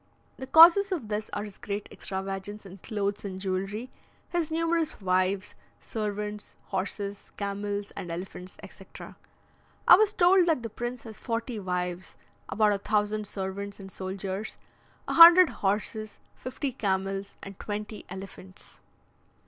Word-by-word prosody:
The 265 - -7
causes 345 +7 +8
of 285 - -3
this 210 0 -3
are 205 - -3
his 205 -2 -10
great 205 0 -4
extravagance 195 +2 -5
in 195 0 -11
clothes 205 +1 -3
and 190 -2 -5
jewellery, 195 +5 -3 0.4
his 340 -3 -1
numerous 330 0 0
wives, 185 0 0 0.3
servants, 210 -1 -5
horses, 200 +1 -4
camels, 205 0 -3
and 175 - -6
elephants, 180 +2 -7
etc. - - -12 0.7
I - - +10
was 425 0 +3
told 360 -2 +4
that 310 -8 +1
the 230 - -5
prince 240 +1 -5
has 220 -2 -10
forty 230 -1 -3
wives, 180 -1 -4 0.3
about 210 0 +3
a 200 - -2
thousand 210 +1 0
servants 200 +1 -5
and 195 -1 -10
soldiers, 190 +3 -5 0.5
a - - -1
hundred 340 +1 +10
horses, 210 +2 -2 0.2
fifty 265 +2 -4
camels, 195 -3 -2
and 195 -1 -9
twenty 210 +1 -6
elephants. 190 0 -11
205 Hz, 135 wpm, -28 LUFS, 195-230 Hz, 0.7 s, I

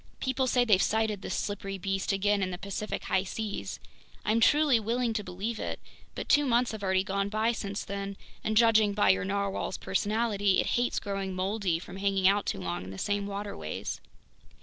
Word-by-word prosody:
People 260 0 0
say 245 0 +3
they've 200 -5 +5
sighted 220 -2 +1
this - - -3
slippery 195 -1 -3
beast 195 +1 -1
again 200 +1 +2
in 185 - 0
the 180 - -4
Pacific 200 +3 -4
high 190 - +1
seas—I'm 215 +2 -4
truly 290 0 +5
willing 230 +2 0
to 215 -1 -2
believe 195 +5 -4
it, - - -3 0.4
but - - -5
two 295 - +5
months 240 0 +3
have 220 -2 -6
already 190 -1 +2
gone 200 0 -1
by 220 +2 +1
since 200 -3 -4
then, 200 0 -4 0.3
and 215 0 0
judging 220 -3 +5
by 205 - +5
your 190 - 0
narwhale's 200 -1 -1
personality, 205 -1 +1
it - - +2
hates 245 0 +1
growing 195 -2 -3
moldy 190 -2 0
from 180 +2 -9
hanging 195 -1 +2
out 200 +1 +3
too - - -1
long 90 -1 -3
in 90 - -8
the 95 - -8
same 205 - -1
waterways! 200 - -5
200 Hz, 190 wpm, -29 LUFS, 195-220 Hz, 0.4 s, they've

